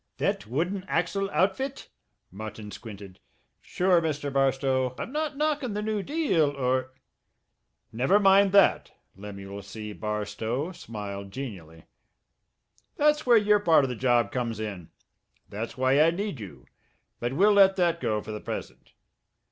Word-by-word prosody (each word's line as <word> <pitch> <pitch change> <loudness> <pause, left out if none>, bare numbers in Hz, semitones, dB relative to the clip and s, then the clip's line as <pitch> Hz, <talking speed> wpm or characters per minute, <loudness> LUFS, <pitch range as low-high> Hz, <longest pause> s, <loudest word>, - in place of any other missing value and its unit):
"That 100 - -1
wooden 175 - -2
axle 180 +4 -1
outfit?" 265 +10 -1 0.4
Martin 110 +1 -8
squinted. 100 -2 -10 0.4
"Sure, 180 -1 +2
Mr. 145 -3 -3
Barstow, 135 -1 +1
I'm - - -5
not 300 -1 -2
knockin' 295 -7 -1
the 210 - -2
new 215 -1 -1
deal, 275 - +1
or 130 -1 -1 0.5
" - - -51
"Never 190 +11 +4
mind 195 0 +5
that." 200 -1 +4 0.2
Lemuel 100 0 -8
C. 105 +2 -8
Barstow 110 - -3
smiled 100 - -7
genially. 95 - -8 1.1
"That's 300 -1 +2
where 240 -2 +7
your 210 -1 +4
part 165 -7 +4
of 130 - -3
the - - -4
job 120 -1 +2
comes 120 -5 -3
in. 100 -6 -6 0.6
That's 110 +5 -6
why 130 +3 +3
I 160 - +6
need 195 - -3
you. 75 - -10 0.5
But 120 +2 -2
we'll 200 +8 +4
let 195 -1 +6
that 170 -2 +1
go 105 -1 -1
for - - -7
the 105 - -6
present. - - -7
135 Hz, 145 wpm, -27 LUFS, -, 1.1 s, where